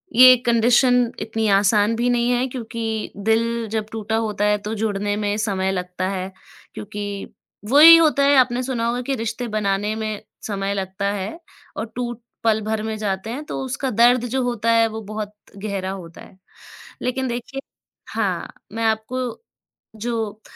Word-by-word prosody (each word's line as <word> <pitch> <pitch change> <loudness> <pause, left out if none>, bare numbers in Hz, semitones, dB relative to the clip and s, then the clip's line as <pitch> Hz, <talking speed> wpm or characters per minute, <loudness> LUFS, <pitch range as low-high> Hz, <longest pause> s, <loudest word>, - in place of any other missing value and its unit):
ये 255 +1 +10
कंडीशन 240 +1 +4
इतनी 225 0 -1
आसान 205 +2 +3
भी 240 +2 +1
नहीं 240 0 +2
है, 245 +1 +1
क्योंकि 230 -3 -4
दिल 230 +1 +1
जब 220 -1 -1
टूटा 220 0 -3
होता 215 -2 0
है, 210 0 +3
तो 210 +1 -5
जुड़ने 205 -1 -1
में 205 -1 -1
समय 195 -3 0
लगता 180 0 -3
है। 190 -1 -4 0.4
क्योंकि 205 -1 -6 0.4
वही 305 +5 +10
होता 300 -4 +3
है, 285 +1 +5
आपने 250 0 +3
सुना 240 -3 -1
होगा 245 +1 -1
कि 270 +2 -2
रिश्ते 230 +1 -3
बनाने 210 -1 -1
में 215 -1 -4 0.3
समय 200 -1 -2
लगता 195 +1 -2
है 205 - -5 0.4
और 225 - -2
टूट 240 -1 -4 0.2
पल 220 -1 +2
भर 215 0 -2
में 220 0 -3
जाते 200 0 -3
हैं, 265 +6 -4
तो - - -4
उसका 265 +1 -3
दर्द 240 +2 +4
जो 260 +2 -1
होता 230 -2 0
है, 230 0 +4
वो 220 0 -6
बहुत 210 0 -6 0.2
गहरा 195 -2 -3
होता 175 -3 -9
है। 185 - -15 0.6
लेकिन 260 +1 -1
देखिए 245 +3 -5 0.5
हाँ, - - -2 0.2
मैं 230 - -3
आपको 225 +3 -2 0.5
जो 220 -1 -3
220 Hz, 165 wpm, -22 LUFS, 205-240 Hz, 0.6 s, ये